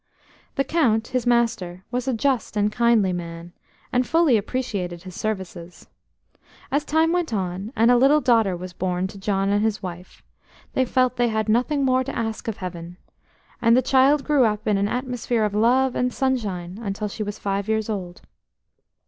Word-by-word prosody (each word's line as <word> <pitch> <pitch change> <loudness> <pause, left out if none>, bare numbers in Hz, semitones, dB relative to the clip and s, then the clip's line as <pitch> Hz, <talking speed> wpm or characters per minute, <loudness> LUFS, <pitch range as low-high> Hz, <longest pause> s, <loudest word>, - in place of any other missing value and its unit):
The 275 - +2
Count, 245 -7 +1
his 250 -1 -1
master, 210 -7 0
was 250 +1 -2
a 260 - +1
just 250 -2 0
and 210 0 +2
kindly 230 -5 +3
man, 170 0 -7 0.4
and 250 0 +3
fully 325 -6 +4
appreciated 200 -6 -3
his 185 -1 -9
services. 185 -4 -5 0.8
As 285 +2 +1
time 320 +2 +2
went 350 -4 0
on, 190 +2 -3
and 230 +2 +4
a 245 - +5
little 275 +5 +5
daughter 225 -9 +2
was 180 +1 -8
born 180 0 -2
to 200 +1 -7
John 195 0 0
and 205 +1 +2
his 220 -2 -1
wife, 180 0 -8 0.5
they 260 - +2
felt 255 0 +1
they 245 0 +3
had 220 -1 -1
nothing 255 +6 +1
more 260 0 +2
to - - -5
ask 225 -1 -3
of 225 - -3
Heaven, 175 -1 -7 0.6
and 230 +1 +5
the 255 - +3
child 275 +3 +4
grew 295 -4 +3
up 215 -1 0
in 210 -2 +3
an 200 - +1
atmosphere 245 -1 -1
of 210 - -2
love 245 +5 +3
and 250 0 0
sunshine 210 -9 -2
until 210 0 -3
she 205 - -7
was 205 -1 -4
five 200 0 -2
years 220 -1 0
old. 185 -5 -5
220 Hz, 180 wpm, -23 LUFS, 195-255 Hz, 0.8 s, a